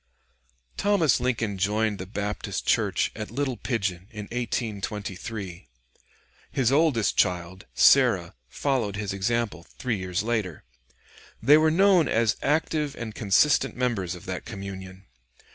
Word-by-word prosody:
] - - -43 0.3
Thomas 200 -9 +3
Lincoln 115 -5 -1
joined 105 +1 0
the 95 - -6
Baptist 105 0 -4
church - - +1
at 110 -1 -5
Little 130 +1 -2
Pigeon 100 -6 -3
in 105 -3 -7
1823; 105 - -4 0.8
his 130 -2 +1
oldest 140 -7 +2
child, 90 +1 0
Sarah, - - +5
followed 115 - -1
his 100 -1 -3
example 105 -1 -1
three 120 -4 -1
years 95 +1 -2
later. 110 -8 -2 0.8
They 150 +2 +6
were 155 0 +4
known 180 -1 +4
as 115 -1 +2
active 150 0 0
and 115 -2 -6
consistent 110 +8 +3
members 110 -8 -1
of 90 - -12
that 95 -1 -4
communion. 95 -3 -8
110 Hz, 125 wpm, -26 LUFS, 95-125 Hz, 0.8 s, They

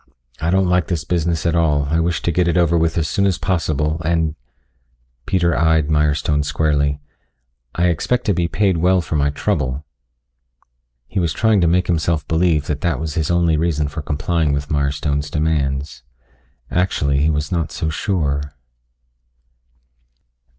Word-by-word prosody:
I 80 - -1
don't 95 +1 +3
like 90 -1 +2
this 85 -4 -2
business 85 -1 -1
at 85 - +2
all. 75 -4 +2
I 80 - +2
wish 85 0 -1
to 85 - +1
get 90 +1 +1
it 85 0 +1
over 85 -1 +3
with 80 0 +1
as 80 -2 +1
soon 100 +6 +1
as 95 - 0
possible, 80 -3 -1
and 80 -1 0 0.5
" - - -44
Peter 85 -3 +1
eyed 80 -2 +2
Mirestone 75 0 +1
squarely. 70 -1 0 0.8
"I 85 - +1
expect 90 +9 0
to 105 - +2
be 85 -1 0
paid 95 +2 +1
well 90 +2 +3
for 80 - -4
my 70 -1 +2
trouble." 65 -1 -2 1.2
He 95 - -2
was 85 -3 0
trying 110 -4 +2
to 85 - +3
make 90 +2 +2
himself 80 -2 0
believe 80 -2 +1
that 75 -1 -3
that 85 - 0
was 80 -2 -4
his 80 -2 -1
only 85 -2 +2
reason 75 -2 0
for 75 +2 -6
complying 80 +1 -1
with 70 +1 -3
Mirestone's 70 0 -1
demands. 75 -2 -1 0.7
Actually 70 -6 +1
he 75 +2 +2
was 75 -1 -1
not 85 -3 -1
so 80 - -2
sure.... 75 -5 -2
80 Hz, 165 wpm, -19 LUFS, 75-85 Hz, 1.2 s, don't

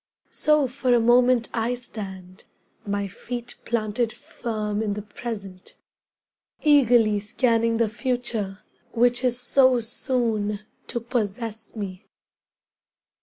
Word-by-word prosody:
So 300 -2 +3
for 255 0 -1
a - - +4
moment 240 +1 +4
I 235 +2 0
stand, 190 -6 -8 0.4
my 200 0 -1
feet 240 +5 -6
planted 225 0 0
firm 215 -3 -4
in 210 -2 -1
the 210 - -5
present, 205 -4 -7 0.9
Eagerly 240 -8 +5
scanning 230 +2 +1
the 230 -1 +2
future 220 -4 -2 0.3
which 245 +1 +3
is 245 -1 +3
so 255 0 +4
soon 225 -3 -1 0.3
to 235 - -1
possess 225 -1 -3
me. 190 -4 -6
230 Hz, 110 wpm, -24 LUFS, 210-245 Hz, 0.9 s, Eagerly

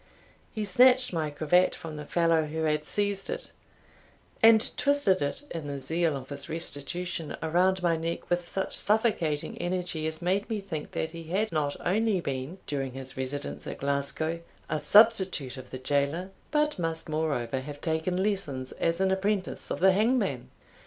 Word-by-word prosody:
He 215 -2 -3
snatched 250 +4 +5
my 160 -3 0
cravat 155 +5 +3
from 165 -3 -7
the 150 -1 -7
fellow 165 -2 +3
who 160 +1 -3
had 150 -1 0
seized 200 -1 -1
it, - - -5 0.9
and 225 0 +6
twisted 285 -10 +2
it 145 - -2
(in 160 -3 -5
the 140 -1 -4
zeal 160 +2 0
of 130 -1 -10
his 140 -1 -6
restitution) 165 +1 -4
around 180 +3 +2
my 170 -1 +3
neck 165 +1 -3
with 175 0 0
such 190 +1 -2
suffocating 205 -9 +1
energy 175 -3 -2
as 160 0 -5
made 185 +4 0
me 220 -2 -1
think 175 -7 -6
that 160 - -2
he 165 -1 -8
had 195 +6 0
not 150 -3 0
only 210 +1 +2
been, 140 +2 -4
during 135 -3 -3
his 130 0 -8
residence 130 +2 -4
at - - -5
Glasgow, 140 +4 -1 0.3
a 155 - +1
substitute 190 - +5
of 130 -1 -10
the 130 - -6
jailor, 145 +7 -1 0.2
but 300 -5 +1
must 165 -1 -2
moreover 145 -6 -1
have 145 +2 -8
taken 165 +4 0
lessons 145 -11 -2
as 165 +2 +1
an 190 0 +3
apprentice 195 0 -1
of - - -2
the 190 +1 +7
hangman. 205 - +1
165 Hz, 170 wpm, -28 LUFS, 145-190 Hz, 0.9 s, the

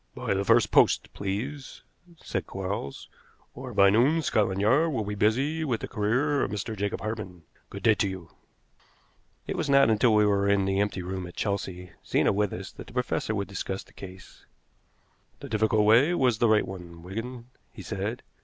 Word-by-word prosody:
"By - - -2
the 100 0 0
first 115 +3 +3
post, - - +3
please," 125 +9 -5 0.4
said - - -3
Quarles, 95 -7 -5 0.5
"or - - -8
by 100 0 +5
noon 140 +10 +3
Scotland 100 -7 +1
Yard 135 +11 +3
will 115 -6 -1
be 105 0 -4
busy 135 +10 +1
with 125 -7 -1
the - - -4
career 130 +8 0
of - - 0
Mr. 105 +2 -4
Jacob 100 0 -3
Hartmann. 105 -5 -6 0.3
Good - - -9
day 110 - +6
to 105 -1 0
you." 90 -4 -8 1.1
It - - -4
was - - -2
not 140 -4 +5
until 110 +1 +3
we 105 0 +5
were 100 -1 +2
in 100 -1 +3
the 95 0 0
empty 100 -2 -1
room 95 0 -5
at 90 - -12
Chelsea, 95 -3 -3
Zena - - +2
with 105 0 0
us, 95 +1 -7
that - - -11
the 120 - -13
professor 125 -3 -1
would 100 -1 -2
discuss 95 -1 -4
the - - -23
case. 95 -1 -12 0.9
"The 140 - -9
difficult 110 -1 +2
way 125 +11 +5
was 125 -7 +2
the 120 - +3
right 110 -1 +3
one, 85 -3 -9
Wigan," 115 +6 -7 0.2
he - - -10
said. - - -4
105 Hz, 190 wpm, -27 LUFS, 95-120 Hz, 1.1 s, day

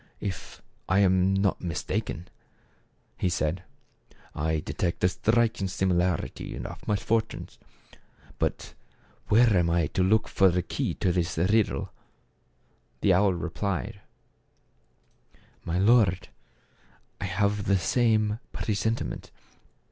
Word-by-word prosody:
" - - -34
If 95 -4 -6 0.3
I 95 - +3
am 95 -1 +3
not 95 0 +1
mistaken," 90 +2 -3 0.9
he 90 - +1
said, 85 +1 -1 0.4
" - - -28
I 80 -1 +1
detect 85 +3 -3
a 90 - +5
striking 110 +2 +1
simi 95 0 0
larity 85 -2 -1
in - - -6
our - - -7
misfortunes; 110 +2 -1 0.8
but - - -2 0.5
where 115 0 +5
am 85 -2 +3
I 85 -1 +2
to 90 - -2
look 105 +4 +3
for 95 -1 +4
the 90 0 0
key - - -2
to 90 - 0
this 85 -1 -1
riddle? 100 +6 +1 0.6
" - - -41
The 95 - +4
owl 95 0 +3
replied, 90 - -3 1.6
"My 85 +1 -2
lord, 100 -2 +3 0.9
I - - -3
also 90 - -5
have 100 +1 +1
the 100 - +3
same 110 +2 +1
presentiment. 110 +2 -2
95 Hz, 125 wpm, -27 LUFS, 90-105 Hz, 1.6 s, a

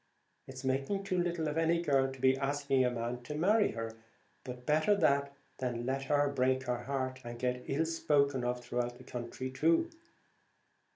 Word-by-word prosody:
It's 130 0 -8
making 135 +9 0
too 185 -2 -1
little 175 -2 0
of 150 +2 -1
any 165 +1 +3
girl 135 -5 +2
to 135 - -10
be 130 +1 +4
asking 140 -1 +1
a 125 - +3
man 120 0 -3
to 135 +5 -6
marry 205 +7 +3
her, 115 0 -5 0.5
but 125 -1 -8
better 155 +7 +3
that 140 -7 +2 0.3
than 120 -2 -2
let 135 +1 -1
her 145 +1 +3
break 130 -1 +1
her 120 -1 -3
heart, 130 -1 -2
and 120 0 -7
get 125 0 -2
ill 150 +4 +1
spoken 140 -5 +1
of 125 0 -2
through 120 0 -1
the - - -13
country 125 +2 -5
too." 165 - +2
135 Hz, 180 wpm, -32 LUFS, 125-150 Hz, 0.5 s, be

